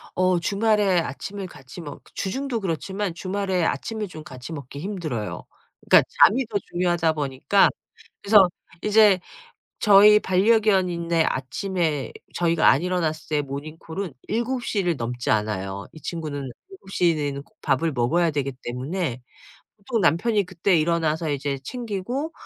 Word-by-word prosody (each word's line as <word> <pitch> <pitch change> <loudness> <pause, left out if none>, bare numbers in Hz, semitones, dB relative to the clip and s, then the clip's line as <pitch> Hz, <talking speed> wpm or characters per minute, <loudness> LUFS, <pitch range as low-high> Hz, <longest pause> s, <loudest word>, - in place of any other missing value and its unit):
어 185 -1 +2
주말에 205 0 +2
아침을 190 +6 -5
같이 135 0 -11
먹 145 -3 -9
주중도 255 +4 -2
그렇지만 195 +1 -3
주말에 190 0 -1
아침을 220 +5 -2
좀 160 -4 -10
같이 130 +3 -9
먹기 140 -2 -8
힘들어요. 155 - -4 0.4
그니까 - - +6 0.2
잠이 255 +5 +5
더 215 -2 -1
중요하다 175 -2 +1
보니까 145 +6 +2 0.5
그래서 200 -3 +6 0.3
이제 210 -2 +5 0.6
저희 210 0 +7
반려견인의 185 -5 +2
아침에 155 +2 -2 0.2
저희가 170 -1 +2
안 135 - +4
일어났을 165 -3 -1
때 - - +2
모닝콜은 155 +5 -6
7:00 235 -1 -1
를 175 -2 +1
넘지 120 -1 -4
않아요. 100 -2 -1
이 155 - -13
친구는 155 -4 -4 0.3
7:00 195 - 0
내에는 140 -2 -3
꼭 - - -32
밥을 160 +5 +1
먹어야 160 +8 +2
되기 140 -2 -2
때문에 130 +2 -3 0.6
보통 225 +3 -2
남편이 200 +6 +2
그때 180 0 +1
일어나서 160 0 0
이제 140 0 -2
챙기고 245 - -4
175 Hz, 300 characters per minute, -24 LUFS, 145-200 Hz, 0.6 s, 저희